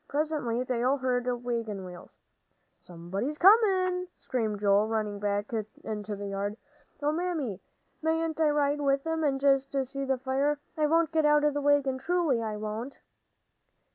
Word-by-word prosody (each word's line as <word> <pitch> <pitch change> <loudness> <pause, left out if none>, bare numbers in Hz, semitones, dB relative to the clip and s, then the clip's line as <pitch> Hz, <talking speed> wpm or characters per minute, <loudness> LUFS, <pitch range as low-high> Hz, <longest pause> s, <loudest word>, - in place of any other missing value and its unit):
Presently 285 -5 -1
they 250 -2 -2
all 260 +3 +2
heard 250 -2 -1 0.2
wagon 225 -5 -3
wheels. 180 -1 -12 0.6
"Somebody's 190 - -5
comin'!" 370 -2 +4
screamed 220 -5 -2
Joel, 205 +1 +4
running 215 -2 -2
back 205 0 -1 0.3
into 210 -1 -4
the 200 0 -6
yard. 200 +2 -3 0.5
"Oh, 295 - +2
Mammy, 310 - -2 0.4
mayn't 320 0 0
I 310 - +4
ride 290 0 +1
with 275 0 +1
'em 325 0 -1
and 275 -2 +1
just 275 0 +2
see 275 +2 -5
the 265 -1 0
fire? 270 +3 0 0.2
I 305 -2 +2
won't 330 +1 +2
get 315 -2 +3
out 295 0 +4
of 295 -1 +3
the 290 - -1
wagon; 280 -2 +2
truly, 315 -4 +1
I 215 -2 -3
won't." 215 +5 -5
270 Hz, 160 wpm, -28 LUFS, 215-300 Hz, 0.6 s, comin